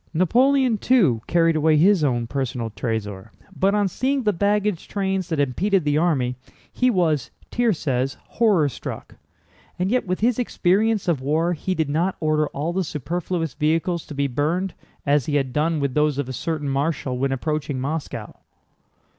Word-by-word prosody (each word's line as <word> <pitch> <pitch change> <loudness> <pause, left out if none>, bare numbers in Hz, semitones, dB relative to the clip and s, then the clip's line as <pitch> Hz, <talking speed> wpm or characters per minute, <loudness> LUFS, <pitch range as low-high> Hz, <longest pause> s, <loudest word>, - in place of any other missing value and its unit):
Napoleon, 250 - +3
too, 180 - +3
carried 165 -1 +3
away 155 0 +3
his 180 +1 +4
own 120 -4 +1
personal 120 -2 -3
trésor, 105 -2 -4 0.3
but 195 +2 +2
on 205 -1 +2
seeing 265 +7 -1
the 210 -2 +2
baggage 200 0 0
trains 190 -2 -2
that 160 -3 -1
impeded 180 +8 +1
the 145 0 +2
army, 135 -7 +1 0.4
he 255 - +2
was 165 - +1 0.2
(Thiers 230 -7 +1
says) 135 -2 -1
horror 205 -10 +2
struck. 135 - -7 0.6
And 185 +3 0
yet 250 -4 +1
with 185 +2 -2
his 240 +1 +2
experience 215 -2 +1
of 160 -7 +1
war 160 +6 +1
he 185 +3 -2
did 160 -3 0
not 165 +6 0
order 155 -1 +1
all 150 +5 -3
the 190 +1 0
superfluous 165 +2 -3
vehicles 165 +3 0
to 150 - -8
be 140 0 0
burned, 155 +8 -1 0.3
as 140 -2 +2
he 150 - 0
had 135 -3 0
done 155 +1 +1
with 140 -2 -1
those 150 -1 +2
of 145 -3 -2
a 130 - -5
certain 155 +2 -3
marshal 135 -2 -1
when 135 +1 0
approaching 145 0 -2
Moscow. 150 +4 -5
160 Hz, 170 wpm, -23 LUFS, 140-190 Hz, 0.6 s, his